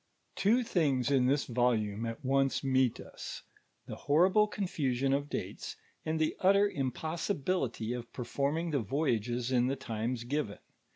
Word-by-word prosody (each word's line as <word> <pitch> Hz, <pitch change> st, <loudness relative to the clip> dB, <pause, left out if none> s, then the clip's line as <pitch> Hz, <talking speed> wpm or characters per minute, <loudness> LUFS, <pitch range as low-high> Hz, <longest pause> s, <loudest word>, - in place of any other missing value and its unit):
Two 230 Hz, +6 st, +3 dB
things 140 Hz, -, +1 dB
in 130 Hz, -2 st, +4 dB
this 140 Hz, +2 st, +2 dB
volume 115 Hz, -3 st, 0 dB
at 115 Hz, +4 st, -6 dB
once 135 Hz, +1 st, +2 dB
meet 130 Hz, -3 st, +2 dB
us, -, -, -8 dB, 0.4 s
the -, -, -6 dB
horrible 185 Hz, +8 st, +4 dB
confusion 135 Hz, -10 st, -1 dB
of 140 Hz, +1 st, -1 dB
dates, -, -, -5 dB, 0.3 s
and 155 Hz, 0 st, -1 dB
the 155 Hz, -, +1 dB
utter 200 Hz, +2 st, +5 dB
impossibility 145 Hz, -, -2 dB
of 120 Hz, -1 st, -6 dB
performing 145 Hz, +6 st, -1 dB
the 140 Hz, -, +1 dB
voyages 120 Hz, -1 st, -1 dB
in 125 Hz, -1 st, +3 dB
the 135 Hz, -, 0 dB
times 115 Hz, -1 st, -3 dB
given. 120 Hz, -4 st, -2 dB
135 Hz, 140 wpm, -31 LUFS, 120-155 Hz, 0.4 s, utter